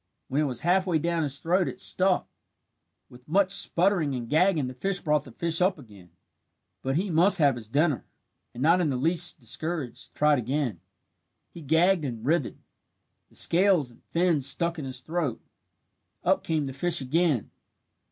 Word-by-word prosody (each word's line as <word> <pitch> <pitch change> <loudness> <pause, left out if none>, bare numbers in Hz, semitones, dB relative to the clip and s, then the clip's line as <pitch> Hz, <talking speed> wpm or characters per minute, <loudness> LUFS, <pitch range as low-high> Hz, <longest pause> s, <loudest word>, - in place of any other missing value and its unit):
When 140 +3 0
it - - +1
was 125 -4 -3
half 185 +3 +2
way 170 -3 +2
down 170 +1 -1
his 140 -3 -1
throat 180 +5 +1
it - - -6
stuck. 185 0 +2 0.8
With 125 0 -17
much 190 +4 +2
sputtering 175 -6 +2
and 120 -2 -5
gagging 160 +1 +2
the 125 - -6
bird 185 +9 -2
brought 150 -2 +1
the 130 - -12
fish 165 +6 -1
up 185 0 +2
again. 100 - -15 0.7
But 135 +1 -2
he 185 +4 -1
must 175 +5 +4
have 145 -5 +4
his 115 -3 -9
dinner, 145 +2 +1 0.5
and 125 - -6
not 170 +4 +4
in 160 - +1
the 135 - -1
least 165 +6 +2
discouraged, 145 +3 -5
tried 150 -2 +3
again. 125 - -2 0.7
He 170 - -11
gagged 165 +4 +2
and 120 -4 -5
writhed. 150 -2 0 0.7
The - - -23
scales 175 -7 +3
and 120 - -22
fins 165 -6 +1
stuck 170 +4 0
in 145 - -5
his 130 -1 -6
throat. 155 -4 -3 0.8
Up - - +2
came 155 -3 -1
the 135 - -6
fish 175 +5 0
again. 145 - 0
155 Hz, 175 wpm, -26 LUFS, 130-175 Hz, 0.8 s, must